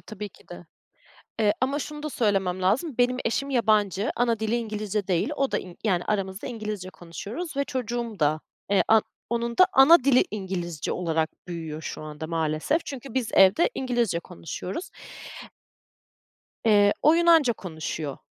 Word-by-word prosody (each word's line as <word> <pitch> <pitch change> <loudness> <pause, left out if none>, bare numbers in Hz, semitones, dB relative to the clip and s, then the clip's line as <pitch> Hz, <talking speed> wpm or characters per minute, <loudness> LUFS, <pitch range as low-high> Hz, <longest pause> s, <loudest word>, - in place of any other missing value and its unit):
tabii 210 -2 -7
ki - - -22
de, 175 -1 -10 0.7
eee, 205 -1 +4
ama 275 +3 0
şunu 300 0 -6
da 305 - -4
söylemem 195 -6 0
lazım, 265 - +1
benim 250 +1 +3
eşim 275 +5 -1
yabancı, 215 -5 +2
ana 235 -2 +1
dili 220 +2 0
İngilizce 215 -3 -3
değil. 180 - +1
O 275 -1 0
da, - - +2
in 180 -2 -10
yani, 180 -4 +1
aramızda 195 -2 -2
İngilizce 210 -5 -5
konuşuyoruz 215 - -7
ve 280 - +1
çocuğum 240 -4 -4
da, 155 +1 +2 0.3
eee, 200 - +4
an 220 -1 +6 0.3
onun 235 0 -1
da 370 - +8
ana 270 +2 +7
dili 270 -2 +5
İngilizce 180 -6 -4
olarak 160 -2 0 0.2
büyüyor 160 -3 -6
şu 155 - -6
anda, 155 +1 -7
maalesef. 160 - -1
Çünkü 270 -3 -7
biz 255 -4 0
evde 195 - +5
İngilizce 240 -9 0
konuşuyoruz. 180 - -7 1.8
Eee, 205 -2 +5
o 310 - +6
Yunanca 330 -7 +5
konuşuyor. 160 -6 -5
215 Hz, 155 wpm, -26 LUFS, 180-250 Hz, 1.8 s, da